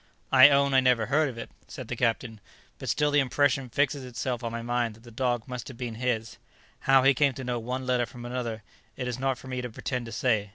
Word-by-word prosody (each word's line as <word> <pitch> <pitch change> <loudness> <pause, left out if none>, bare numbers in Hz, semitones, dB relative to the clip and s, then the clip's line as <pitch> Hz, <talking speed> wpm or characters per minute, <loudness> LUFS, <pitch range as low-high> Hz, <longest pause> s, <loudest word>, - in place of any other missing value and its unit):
"I 130 +1 +9
own 140 -1 +3
I 135 - +6
never 125 -3 +3
heard 150 +4 +2
of 120 - -9
it," 115 - -7 0.2
said - - -8
the - - -3
captain; 115 -2 -1 0.4
"but - - -5
still 150 0 +2
the 145 - +4
impression 135 -1 +1
fixes 140 +2 0
itself 125 0 -4
on 115 - -3
my 115 0 -5
mind 120 -2 -1
that 110 - -19
the 120 - -13
dog 120 0 -1
must 125 -2 -6
have 130 - -9
been 120 -2 -4
his; 115 -1 -2 0.5
how 135 -1 +7
he 135 +1 +6
came 140 +1 +2
to 130 0 -7
know 120 -1 -2
one 125 +3 -4
letter 125 -2 +1
from 120 -1 -10
another, 120 -3 -4 0.3
it 125 - -3
is 125 0 -3
not 135 -1 0
for 130 - -12
me 130 -1 -3
to 125 - -5
pretend 120 +1 -4
to - - -8
say. 110 -2 0
125 Hz, 250 wpm, -27 LUFS, 115-135 Hz, 0.5 s, I